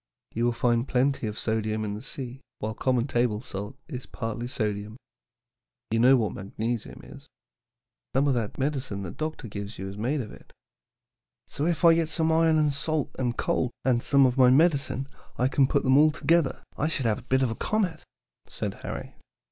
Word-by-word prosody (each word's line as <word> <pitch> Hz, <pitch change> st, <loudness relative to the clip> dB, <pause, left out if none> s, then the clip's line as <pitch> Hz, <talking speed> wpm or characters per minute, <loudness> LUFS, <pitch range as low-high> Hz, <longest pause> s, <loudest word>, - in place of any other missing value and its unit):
You 115 Hz, +2 st, 0 dB
will 120 Hz, -, +3 dB
find 120 Hz, +1 st, +1 dB
plenty 130 Hz, -2 st, +1 dB
of 105 Hz, 0 st, -5 dB
sodium 110 Hz, -1 st, -1 dB
in 100 Hz, -, -3 dB
the 105 Hz, -, -6 dB
sea, 130 Hz, 0 st, -6 dB, 0.2 s
while 110 Hz, +1 st, -3 dB
common 125 Hz, 0 st, +1 dB
table 120 Hz, -5 st, +1 dB
salt 105 Hz, 0 st, -6 dB
is 130 Hz, -5 st, -7 dB
partly 120 Hz, +1 st, -4 dB
sodium. 105 Hz, -2 st, -3 dB, 0.9 s
You 115 Hz, -, +2 dB
know 130 Hz, +3 st, +7 dB
what 110 Hz, -4 st, 0 dB
magnesium 110 Hz, +4 st, -4 dB
is. -, -, -13 dB, 0.9 s
Some 135 Hz, +2 st, +3 dB
of 140 Hz, -, +3 dB
that 115 Hz, -4 st, -2 dB
medicine 135 Hz, -8 st, -2 dB
doctor 155 Hz, -5 st, -4 dB
gives 100 Hz, 0 st, -6 dB
you 95 Hz, -, -5 dB
is 100 Hz, +1 st, -7 dB
made 135 Hz, +6 st, 0 dB
of 105 Hz, -, -7 dB
it." -, -, -15 dB, 0.9 s
"So 150 Hz, -, -2 dB
if 175 Hz, 0 st, +1 dB
I 165 Hz, -, +9 dB
get 165 Hz, -1 st, +1 dB
some 160 Hz, 0 st, +1 dB
iron 160 Hz, 0 st, +4 dB
and 150 Hz, -2 st, +2 dB
salt 150 Hz, +1 st, -2 dB
and 120 Hz, -2 st, -1 dB
coal 125 Hz, -, 0 dB, 0.2 s
and 125 Hz, -3 st, +3 dB
some 140 Hz, +1 st, +4 dB
of 130 Hz, +1 st, +1 dB
my 125 Hz, -1 st, +7 dB
medicine, 140 Hz, -2 st, +3 dB, 0.3 s
and 130 Hz, +1 st, +3 dB
put -, -, +2 dB
them 130 Hz, +1 st, +5 dB
all 155 Hz, +1 st, +7 dB
together, 160 Hz, -1 st, +1 dB
I 150 Hz, -, 0 dB
should 150 Hz, -5 st, -1 dB
have 110 Hz, -2 st, +1 dB
a 125 Hz, -, -18 dB
bit 130 Hz, 0 st, +3 dB
of 125 Hz, -, +1 dB
a -, -, -3 dB
comet," 185 Hz, -, -1 dB, 0.4 s
said -, -, -3 dB
Harry. -, -, -6 dB
125 Hz, 190 wpm, -27 LUFS, 115-145 Hz, 0.9 s, I